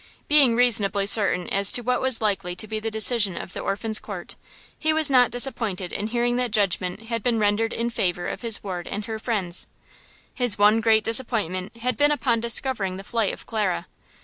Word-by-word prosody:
Being 280 -6 +4
reasonably 210 -5 +3
certain 200 -4 +4
as 200 0 +4
to 245 - +4
what 250 +1 -1
was 260 -3 +1
likely 195 -4 -2
to 215 - -4
be 215 +1 -4
the 225 +1 -4
decision 220 -3 +2
of 185 - -8
the - - -6
Orphans' 215 +2 -1
Court, - - -9 0.4
he 315 - 0
was 310 -2 +1
not 250 -2 +4
disappointed 225 -8 -1
in 210 - -3
hearing 240 +1 -1
that 250 -1 -1
judgment 195 -2 -1
had 230 -2 -2
been 235 +1 -1
rendered 215 +2 0
in 235 +1 -3
favor 175 -5 -2
of - - -6
his 230 -3 0
ward 180 -3 -6
and 205 +1 -5
her 220 0 -6
friends. 195 -7 -1 0.7
His 245 -5 +1
one 210 +2 +4
great 220 -1 +2
disappointment 220 -5 +1
had 250 +2 -3
been 290 0 +3
upon 260 -6 0
discovering 225 -5 -1
the 195 - -9
flight 225 -1 -1
of - - -10
Clara. 210 - -2
220 Hz, 200 wpm, -23 LUFS, 200-240 Hz, 0.7 s, Being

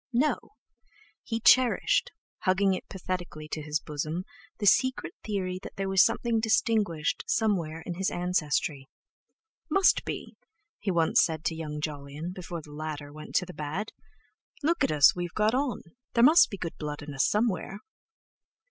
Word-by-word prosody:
No! 300 - 0 0.7
he 225 -1 -3
cherished, 255 - +4 0.3
hugging 190 +1 +2
it 185 - -6
pathetically 180 -5 -5
to 155 - -3
his 150 0 -1
bosom 155 +5 -4 0.3
the 210 - -3
secret 260 +6 +3
theory 185 -3 -2
that - - -10
there 195 0 -2
was 190 -1 +5
something 235 -2 +1
distinguished 220 -7 +1
somewhere 170 -8 0
in 175 - -3
his 190 +2 -1
ancestry. 155 -5 -1 0.8
"Must 390 -1 +4
be," - - -6 0.4
he 205 - -3
once 170 -3 +3
said 160 -2 -2
to 160 - 0
young 150 -2 -5
Jolyon, 150 +2 -5
before 175 -3 -7
the 150 - -12
latter 150 -1 -6
went 155 0 -10
to 180 - +3
the 180 - -10
bad. 155 +9 -4 0.7
"Look 335 +3 +2
at - - +2
us, 150 -1 +6
we've 175 -1 -4
got 215 +1 +2
on! 260 -3 -1 0.3
There 235 - +4
must 315 +6 +7
be 200 - -6
good 170 -3 -5
blood 150 -1 -5
in 145 -1 -7
us 135 - +2
somewhere." 210 -2 -1
180 Hz, 160 wpm, -28 LUFS, 155-215 Hz, 0.8 s, must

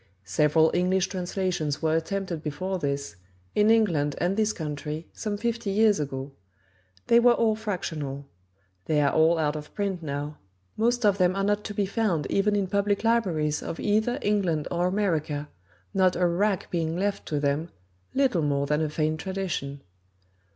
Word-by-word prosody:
Several 150 - +3
English 185 +1 +2
translations 180 -5 -2
were 160 0 +2
attempted 175 0 -2
before 185 +5 -3
this, 140 - -3 0.4
in 210 +1 +4
England 170 -11 +3
and 180 +2 0
this 215 0 +2
country, 150 -1 -5
some 210 -2 -3
fifty 230 0 -2
years 210 +1 +4
ago. 135 -1 -4 0.7
They 235 - +5
were 240 0 +6
all 225 -2 +2
fractional: 160 -10 -4 0.6
they 155 -1 +2
are 145 -1 +2
all 160 +2 +4
out 150 -1 0
of 150 -1 -7
print 195 -3 -2
now: 145 0 -4 0.4
most 240 +1 +1
of 200 -1 +3
them 180 0 +3
are 195 - 0
not 205 +1 +1
to 205 - -5
be 205 - +1
found 195 - 0
even 205 +1 +2
in 200 -1 +1
public 200 +2 0
libraries 175 -11 +1
of 165 - -5
either 220 +3 +1
England 185 -8 +1
or 175 +1 +1
America, 160 -7 -1 0.4
not 185 -2 +3
a 180 - +2
wrack 190 +3 0
being 165 -1 -1
left 200 +2 -2
to 150 - -1
them, 145 +3 0 0.5
little 260 -11 +2
more 140 -1 +1
than 150 +2 +1
a 155 - 0
faint 155 +1 -1
tradition. 175 -7 -4
180 Hz, 165 wpm, -26 LUFS, 150-205 Hz, 0.7 s, were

